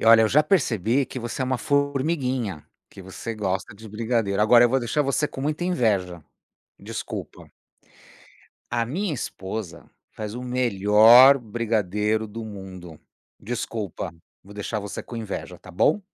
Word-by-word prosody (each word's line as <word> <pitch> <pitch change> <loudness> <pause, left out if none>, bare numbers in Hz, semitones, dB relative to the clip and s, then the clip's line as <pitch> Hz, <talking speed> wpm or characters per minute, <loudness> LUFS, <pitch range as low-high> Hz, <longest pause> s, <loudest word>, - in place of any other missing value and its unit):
E, - - -2
olha, 115 0 +8
eu 110 - +3
já 150 +6 +4
percebi 130 - +1
que 130 - -7
você 120 +2 -4
é - - +1
uma 130 -1 -1
formiguinha, 135 - -1 0.2
que 95 - -13
você 105 +5 -6
gosta 95 -1 -3
de 110 +2 -12
brigadeiro, 110 -2 -1
agora 120 +3 +6
eu - - +4
vou 135 +2 +2
deixar 145 +5 0
você 140 +2 0
com 135 - -8
muita 150 +4 -2
inveja, 100 - 0 0.5
desculpa. - - -7 1.2
A 115 -1 +1
minha 175 - -2
esposa 100 - -6 0.2
faz 105 -1 -6
o 125 - -6
melhor 120 +2 +6
brigadeiro 110 -2 -1
do 110 +1 -7
mundo. 95 -5 -10 0.4
Desculpa, 105 -6 -5 0.3
vou 100 +2 -14
deixar 105 +1 -4
você 100 -1 -6
com 120 - -8
inveja, 110 -3 -6
está - - -16
bom? 110 - +2
115 Hz, 150 wpm, -24 LUFS, 100-130 Hz, 1.2 s, olha